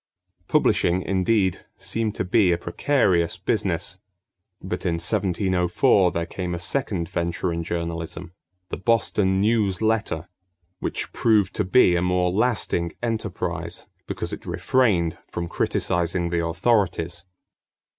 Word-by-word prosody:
Publishing, 90 Hz, +2 st, +2 dB
indeed, 95 Hz, 0 st, +1 dB
seemed 105 Hz, +3 st, -2 dB
to -, -, -1 dB
be 95 Hz, -1 st, +3 dB
a 85 Hz, -, +2 dB
precarious 90 Hz, -, +1 dB
business; -, -, -2 dB, 0.6 s
but -, -, -5 dB
in 85 Hz, -, 0 dB
1704 95 Hz, +2 st, +2 dB
there 85 Hz, 0 st, -2 dB
came 90 Hz, +1 st, -4 dB
a -, -, -3 dB
second 90 Hz, -3 st, -1 dB
venture 85 Hz, +1 st, -2 dB
in 85 Hz, 0 st, -3 dB
journalism, 85 Hz, +1 st, -4 dB, 0.4 s
The -, -, -4 dB
Boston 100 Hz, -3 st, +1 dB
News 105 Hz, -2 st, +2 dB
Letter, 110 Hz, -7 st, 0 dB, 0.5 s
which -, -, -4 dB
proved 105 Hz, -5 st, +2 dB
to 105 Hz, -, +2 dB
be 95 Hz, -2 st, +4 dB
a 85 Hz, -, +1 dB
more 90 Hz, 0 st, +1 dB
lasting 100 Hz, -5 st, 0 dB
enterprise 115 Hz, -2 st, -3 dB, 0.2 s
because -, -, -3 dB
it -, -, -8 dB
refrained 95 Hz, -11 st, +1 dB
from 85 Hz, 0 st, -4 dB
criticizing 85 Hz, 0 st, 0 dB
the 85 Hz, -1 st, 0 dB
authorities. 85 Hz, -2 st, 0 dB
90 Hz, 125 wpm, -24 LUFS, 85-105 Hz, 0.6 s, be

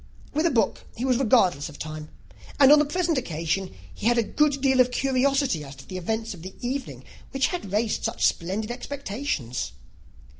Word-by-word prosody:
With 310 Hz, +3 st, +2 dB
a -, -, +3 dB
book, 225 Hz, -9 st, +1 dB
he 245 Hz, -, -3 dB
was 255 Hz, -2 st, +3 dB
regardless 195 Hz, -, +3 dB
of 145 Hz, -, -12 dB
time; 155 Hz, 0 st, -6 dB, 0.5 s
and 275 Hz, -1 st, +8 dB
on 300 Hz, -, +9 dB
the 300 Hz, -, +3 dB
present 335 Hz, -1 st, 0 dB
occasion 170 Hz, -1 st, -2 dB, 0.2 s
he 210 Hz, -, -2 dB
had 240 Hz, 0 st, +4 dB
a 235 Hz, -, +4 dB
good 290 Hz, +4 st, +1 dB
deal 265 Hz, -1 st, +3 dB
of 250 Hz, 0 st, +6 dB
curiosity 270 Hz, -, +1 dB
as 140 Hz, -1 st, -10 dB
to -, -, -14 dB
the 185 Hz, -, -6 dB
event 220 Hz, +5 st, -2 dB
of 170 Hz, -3 st, -12 dB
an 185 Hz, +1 st, -8 dB
evening 260 Hz, +3 st, -4 dB, 0.3 s
which 270 Hz, 0 st, +1 dB
had 345 Hz, -, -5 dB
raised 215 Hz, +2 st, 0 dB
such -, -, 0 dB
splendid 200 Hz, +6 st, 0 dB
expectations. 240 Hz, -, -4 dB
235 Hz, 190 wpm, -25 LUFS, 185-275 Hz, 0.5 s, on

